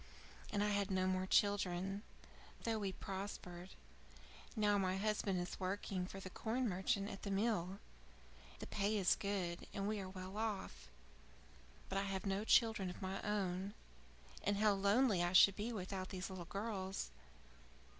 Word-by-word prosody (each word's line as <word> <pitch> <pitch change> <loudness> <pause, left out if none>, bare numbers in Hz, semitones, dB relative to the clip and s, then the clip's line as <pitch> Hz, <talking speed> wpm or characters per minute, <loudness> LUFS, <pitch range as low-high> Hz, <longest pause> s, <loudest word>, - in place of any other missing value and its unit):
And 205 -1 +2
I 210 - +2
had 200 -1 +1
no 185 -1 +2
more 185 0 +1
children, 195 -1 +2 0.6
though 225 -1 0
we 200 -2 -1
prospered. 190 -2 -6 0.9
Now 205 -2 +3
my 185 -1 +1
husband 200 -2 +1
is 175 - -4
working 185 -1 -2
for 195 - -7
the 185 -1 -7
corn 240 +5 -1
merchant 195 +1 0
at 195 - -6
the 200 - -4
mill. 195 -2 +1 0.8
The - - -6
pay 210 +1 0
is 190 -3 +4
good, 190 -4 -2
and 195 0 -1
we 215 0 0
are 190 -1 -5
well 185 +1 -7
off. 215 - -3 1.0
But 195 - 0
I 200 - -1
have 195 -1 -2
no 195 +1 0
children 220 -4 +4
of 180 - -7
my 190 +1 -3
own, 195 -1 -1 0.7
and 205 0 +2
how 210 0 +5
lonely 200 +1 +4
I 175 +1 +1
should 195 +1 +8
be 215 +3 -2
without 190 -3 -4
these 190 +1 -4
little 180 -2 -6
girls! 195 - -3
195 Hz, 160 wpm, -39 LUFS, 185-205 Hz, 1.0 s, should